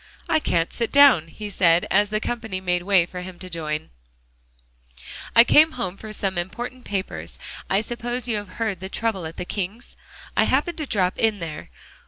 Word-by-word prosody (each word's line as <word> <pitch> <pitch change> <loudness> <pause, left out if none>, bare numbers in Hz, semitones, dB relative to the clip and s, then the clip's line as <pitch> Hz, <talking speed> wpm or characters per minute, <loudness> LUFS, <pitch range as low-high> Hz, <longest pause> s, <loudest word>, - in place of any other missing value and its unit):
"I 315 - +3
can't 170 - 0
sit 230 -2 -2
down," 275 - +7
he 205 +5 -8
said, 175 -2 +3
as 205 +2 +3
the 215 0 0
company 225 -4 -3
made 180 -1 0
way 185 -2 +4
for 180 +1 -7
him 180 0 -9
to 185 0 -10
join 155 -2 -2
them. - - -24 1.5
"I 230 - +10
came 310 +6 +5
home 235 -7 -3
for 215 +2 -9
some 195 -3 -1
important 240 +8 -6
papers. 195 -2 -4 0.3
I 195 +2 +3
suppose 240 +2 -4
you 225 -3 0
have 205 -1 -6
heard 220 -6 -1
the 190 +1 -6
trouble 200 -6 -2
at 160 - -10
the - - -4
Kings? 200 +5 -4 0.4
I - - +4
happened 345 -2 0
to 305 - -3
drop 185 -6 0
in 220 -2 +2
there. 155 - -7
200 Hz, 195 wpm, -23 LUFS, 180-230 Hz, 1.5 s, I